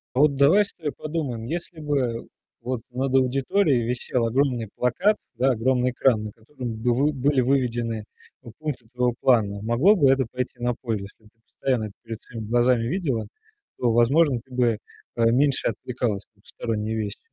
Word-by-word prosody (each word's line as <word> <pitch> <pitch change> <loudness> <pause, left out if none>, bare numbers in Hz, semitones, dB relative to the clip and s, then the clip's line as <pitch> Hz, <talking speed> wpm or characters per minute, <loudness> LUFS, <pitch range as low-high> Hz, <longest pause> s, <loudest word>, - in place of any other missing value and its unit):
А - - +1
вот 145 -2 +4
давай 160 +10 +5
с - - -12
тобой 155 -4 -4
подумаем, 145 -8 -4
если 170 +3 -5
бы 135 -6 -1 0.3
вот 125 0 -3
над 130 +2 -2
аудиторией 135 - +2
висел 125 0 -1
огромный 125 -1 +1
плакат, 180 - +2 0.2
да, 130 +2 +3
огромный 125 +1 +1
экран, 120 -3 +2
на 105 - -5
котором 120 +2 -7
бы 120 +1 +2
вы 145 +5 +2
были 140 0 +2
выведены 120 -4 0 0.4
пу 120 -3 -11
пункты 150 -7 -5
твоего 125 -1 +1
плана, 105 -5 +2
могло 120 - +4
бы 145 -8 +4
это 135 -1 +3
пойти 125 0 -4
на 120 0 0
пользу? 110 -5 -2
Если 105 +2 -13
б - - -18
ты 115 - -44
постоянно 130 -4 -1
это 100 - -8
перед 115 -1 -7
своими 115 -3 -8
глазами 120 0 +3
видела, 140 - -1 0.5
то, 120 -2 +1
возможно, 130 +4 +4
ты 130 - -26
бы 120 -3 +2 0.4
поменьше 125 +4 +2
отвлекалась 115 -2 -2
на 100 - -29
посторонние 110 0 -3
вещи. 105 -2 -4
125 Hz, 175 wpm, -24 LUFS, 115-135 Hz, 0.5 s, давай